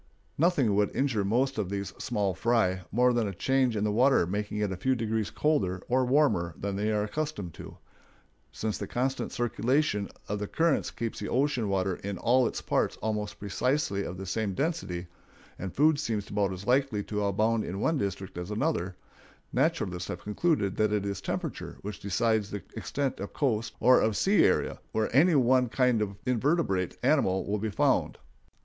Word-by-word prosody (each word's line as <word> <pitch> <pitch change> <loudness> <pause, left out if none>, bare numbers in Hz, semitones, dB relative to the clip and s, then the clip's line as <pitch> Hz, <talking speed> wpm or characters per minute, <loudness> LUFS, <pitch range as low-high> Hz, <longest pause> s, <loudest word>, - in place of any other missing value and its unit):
Nothing 145 - +2
would 105 0 +1
injure 130 -7 +1
most 125 +6 +1
of 100 -4 -1
these 100 0 -4
"small 105 -6 -1
fry" 95 -2 +1
more 125 +3 +3
than 120 -3 +1
a 100 - -5
change 130 +3 +1
in 105 - 0
the 105 - +1
water 125 -2 +4
making 105 +3 -3
it 105 -2 0
a - - -2
few 130 +9 +1
degrees 110 -2 -1
colder 95 -12 0
or 130 +1 +2
warmer 125 - +2
than 100 0 -3
they 105 +2 0
were 105 -1 +1
accustomed 105 - -4
to. - - -10 0.7
Since 110 -1 -3
the - - -4
constant 130 +2 -2
circulation 120 -2 0 0.2
of 105 0 -2
the 105 - -3
currents 165 +4 +1
keeps 115 -1 -4
the - - -4
ocean 130 -4 +1
water 95 -1 0
in 100 -1 -5
all 125 +3 +3
its - - -5
parts - - 0
almost 105 -1 -3
precisely 105 0 -1
of 90 - -6
the 95 - -6
same 100 0 -2
density, 95 - -2 0.5
and 95 0 -4
food 150 - +3
seems 110 -8 -2
about 100 -2 +1
as 95 +1 -7
likely 125 -4 +2
to 105 0 -2
abound 110 +3 +1
in 95 +3 -4
one 160 +6 +1
district 95 -2 -4
as 90 +2 -6
another, 105 - -1 0.6
naturalists 115 - 0
have 85 - -6
concluded 105 - 0
that 110 -1 +2
it 105 -1 0
is 100 -2 -3
temperature - - -4
which 105 -1 -6
decides 105 +1 0
the 100 - -5
extent 135 +6 -2
of 100 - -6
coast 115 -6 -1
or 125 +2 +6
of 110 -2 +1
sea 200 +2 +4
area - - +1
where 110 +2 -1
any 165 +4 +6
one 130 -1 +4
kind 125 -2 +2
of 100 -2 -2
invertebrate 125 - +1
animal 95 0 +2
will 105 +1 -1
be 110 +2 -2
found. 100 - +1
110 Hz, 185 wpm, -28 LUFS, 100-130 Hz, 0.7 s, or